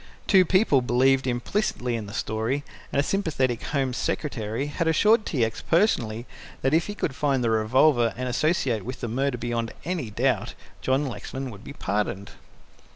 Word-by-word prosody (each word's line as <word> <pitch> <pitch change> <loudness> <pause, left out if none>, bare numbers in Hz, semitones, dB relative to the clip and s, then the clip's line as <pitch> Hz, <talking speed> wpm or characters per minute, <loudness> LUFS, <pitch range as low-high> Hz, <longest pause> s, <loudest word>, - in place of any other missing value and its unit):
Two 190 -3 +5
people 185 - +4
believed 130 +2 +3
implicitly 125 - -1
in 110 -3 -4
the 100 - -9
story, 110 +6 -1 0.3
and 140 - +1
a - - +4
sympathetic 145 - 0
Home 135 -3 -1
Secretary 120 -2 -2
had 160 +3 -2
assured 210 +7 +4
T. 125 -7 +1
X. 110 - -5
personally 120 - +1 0.4
that 135 +2 +2
if 165 +1 +3
he 205 - -5
could 155 - -2
find 135 -2 +1
the 115 - +2
revolver 120 +2 +3
and 125 0 -3
associate 135 -2 +1
it 105 - -9
with 125 +2 -6
the 120 - -2
murder 130 +3 -1
beyond 115 -1 -2
any 165 -10 -2
doubt, 105 - 0 0.3
John 135 +3 +1
Lexman 130 0 -5
would 100 -1 -12
be - - -9
pardoned. 100 -4 -2
130 Hz, 175 wpm, -25 LUFS, 115-150 Hz, 0.4 s, Two